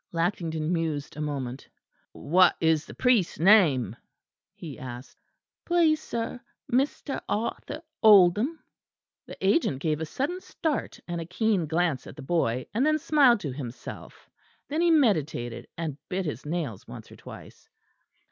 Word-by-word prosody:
Lackington 165 -2 -1
mused 160 -4 -2
a 150 - -5
moment. 135 -3 -4 0.4
"What 180 +4 +3
is 160 -2 +2
the - - -10
priest's 240 -8 +2
name?" 155 - +4 0.6
he 155 -6 -9
asked. 125 0 -9 0.4
"Please, 330 -3 +3
sir, 235 -1 -4 0.3
Mr. 270 +2 0
Arthur 260 +8 -3 0.2
Oldham." 210 - +6 0.7
The - - -9
agent 195 - +2
gave 155 0 -1
a 160 - -3
sudden 315 - -3
start 315 -5 -3
and 170 -1 -3
a - - -5
keen 190 -2 0
glance 165 -4 0
at - - -10
the 150 - -9
boy, 130 -6 0
and 230 +5 +1
then 310 +1 +3
smiled 285 -8 +4
to 145 - -4
himself; 125 -2 -9 0.4
then 305 +3 -1
he 345 - +4
meditated, 160 - +1
and 155 -4 -4
bit 190 -1 -2
his 145 -2 -5
nails 150 - -4
once - - -10
or - - -12
twice. - - -13
175 Hz, 145 wpm, -27 LUFS, 150-235 Hz, 0.7 s, Oldham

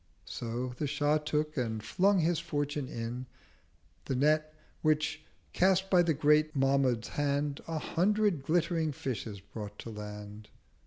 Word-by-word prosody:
So 120 +2 -4
the 150 - 0
Shah 145 +2 +2
took, 150 0 -1
and 110 -5 -2
flung 195 - +3
his 165 0 +2
Fortune 145 -3 -2
in, 120 +2 -5 0.8
The 135 - -1
Net; 155 +3 +2 0.3
which, 155 0 +1 0.3
cast 190 +1 +3
by 180 -2 +6
the 165 -3 +2
Great 150 +1 +3
Mahmud's 135 -4 +2
Hand, 145 0 -1
A 165 -1 -2
hundred 200 +1 +1
glittering 165 0 +1
Fishes 115 -6 -4
brought 105 +1 -8
to 115 - -7
Land. 105 0 -8
145 Hz, 140 wpm, -31 LUFS, 125-160 Hz, 0.8 s, by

